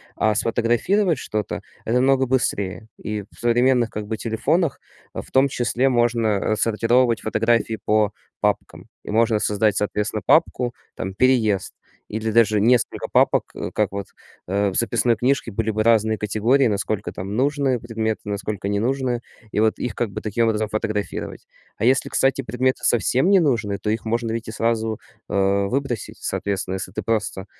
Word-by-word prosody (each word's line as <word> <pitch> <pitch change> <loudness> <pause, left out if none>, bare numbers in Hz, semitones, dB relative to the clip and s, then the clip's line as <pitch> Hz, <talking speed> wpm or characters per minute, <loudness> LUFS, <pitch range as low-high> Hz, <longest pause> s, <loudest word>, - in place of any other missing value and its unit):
А 110 - +2
сфотографировать 120 - +1
что-то- 105 -2 -3 0.2
это 115 - -1
намного 130 +1 +3
быстрее. 110 -5 -1
И 105 -1 -4
в - - -23
современных 120 0 +2
как 105 -1 -5
бы 110 +1 -3
телефонах 140 - 0 0.3
в - - -7
том 135 +1 +4
числе 125 0 0
можно, 120 -2 +2
э, 105 0 0
отсортировать 115 +2 +2
фотографии 115 +1 +1
по 105 -1 +2 0.3
папкам - - -2 0.2
и - - -6
можно 115 0 +3
создать, 105 0 +1
соответственно, 105 0 -1
папку 125 -6 +3 0.2
там 95 0 -5
"переезд", 110 -4 +2 0.4
или 110 +1 -2
даже 110 -2 +4
несколько 120 +2 +2
папок, - - +2 0.2
как - - 0
вот, 100 0 -4 0.4
э, 100 +2 +1
в 95 - -7
записной 120 0 +2
книжке 125 0 0
были 110 +2 -1
бы 110 0 0
разные 110 -1 +3
категории. 115 +6 +2
Насколько 105 0 -2
там 95 +3 -6
нужные 135 0 +1
предметы, 110 -2 -2
насколько 100 -1 -3
не 100 0 0
нужные 125 +1 -1 0.3
и - - -1
вот 110 0 +2
их 120 -4 -3
как 115 -4 -2
бы - - -5
таким 110 +2 0
образом 110 -1 0
фотографировать. 110 -1 -4 0.3
А - - -4
если, 130 +3 +3
кстати, 135 0 +2
предметы 130 +1 -1
совсем 125 - +3
не 195 -1 +6
нужные, 115 - 0
то 105 - -3
их 110 +1 -2
можно 115 0 -1
ведь 115 0 -4
и - - -5
сразу, 115 -1 -1 0.3
э, 100 0 +2
выбросить, 130 -1 -3
соответственно, 95 -2 -2
если 95 - -5
ты 110 - -3
просто 105 -2 -2
110 Hz, 165 wpm, -22 LUFS, 105-125 Hz, 0.4 s, не